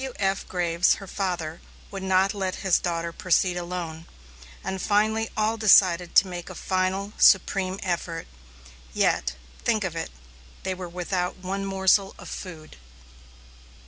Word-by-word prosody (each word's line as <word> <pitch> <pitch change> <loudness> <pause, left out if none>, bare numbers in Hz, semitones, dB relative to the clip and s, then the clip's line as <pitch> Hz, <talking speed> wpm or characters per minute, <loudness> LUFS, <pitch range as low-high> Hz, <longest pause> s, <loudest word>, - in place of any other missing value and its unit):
W.F. 195 -7 -2
Graves, 175 -1 +2
her 200 - -9
father, 175 -5 -3 0.3
would 195 - -5
not 190 +1 +2
let 190 -2 -2
his 190 - +4
daughter 170 -1 -2
proceed 180 0 +2
alone, 170 -2 -5 0.6
and 190 -1 -3
finally 215 +3 +1
all 220 +1 +1
decided 185 -5 +5
to 195 - +7
make 175 -2 -7
a - - -8
final, 190 +2 -1
supreme 190 0 +4
effort. 170 -2 -3 0.7
Yet - - +1 0.3
think 215 -2 +1
of 180 -3 -3
it 165 - -3 0.5
they 190 - -1
were 180 -1 -7
without 180 +1 -2
one 195 +1 -4
morsel 195 0 +2
of - - -10
food! 160 - -8
185 Hz, 140 wpm, -25 LUFS, 175-195 Hz, 0.7 s, to